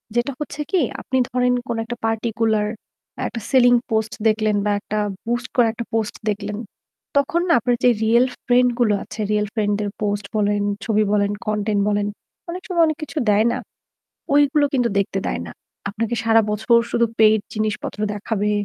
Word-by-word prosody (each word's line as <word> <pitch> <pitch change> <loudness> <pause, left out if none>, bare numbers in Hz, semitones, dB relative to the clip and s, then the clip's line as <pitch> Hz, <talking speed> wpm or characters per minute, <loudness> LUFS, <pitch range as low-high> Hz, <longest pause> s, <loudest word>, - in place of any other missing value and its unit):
যেটা 240 +4 +1
হচ্ছে 300 0 -6
কি 370 -4 +3 0.2
আপনি 260 - -1
ধরেন 250 0 +2
কোন 235 - -2
একটা 240 - -5
পার্টিকুলার 225 -1 0 0.6
একটা 230 - -5
সেলিং 245 -2 +5 0.2
পোস্ট 220 0 0
দেখলেন 215 -1 +2
বা 205 - +2
একটা 215 +1 -3 0.3
বুস্ট 240 +2 -1
করে 240 -2 +5
একটা 235 0 -5
পোস্ট 220 -2 -1
দেখলেন। 205 0 -3 0.6
তখন 330 +5 +2
না 335 - +4
আপনার 245 +2 +1
যে 250 - +7 0.2
রিয়াল 235 +3 +5 0.2
ফ্রেন্ড 250 0 +4
গুলো 215 -4 +3
আছে, 215 - -11
রিয়াল 210 0 +1
ফ্রেন্ড 205 -2 +1
দের 205 -1 -1
পোস্ট 205 -1 -1
বলেন, 205 0 +1 0.2
ছবি 215 -1 +2
বলেন, 200 -1 +2
কনটেন্ট 210 -1 0
বলেন, 205 0 0 0.4
অনেক 365 +2 -5
সময় 345 -3 +3
অনেক 310 - -1
কিছু 305 - -8
দেয় 210 +2 +4
না। - - -1 0.8
ঐগুলো 290 0 +4
কিন্তু 245 -2 +2
দেখতে 195 0 0
দেয় - - -2
না। 80 - -8 0.4
আপনাকে 225 +3 -2
সারা 225 0 +5
বছর 220 +3 +3
শুধু 235 0 +2
পেইড 220 -1 +5
জিনিসপত্র 215 -1 -3
দেখাবে, 210 0 -1
220 Hz, 175 wpm, -21 LUFS, 210-245 Hz, 0.8 s, যে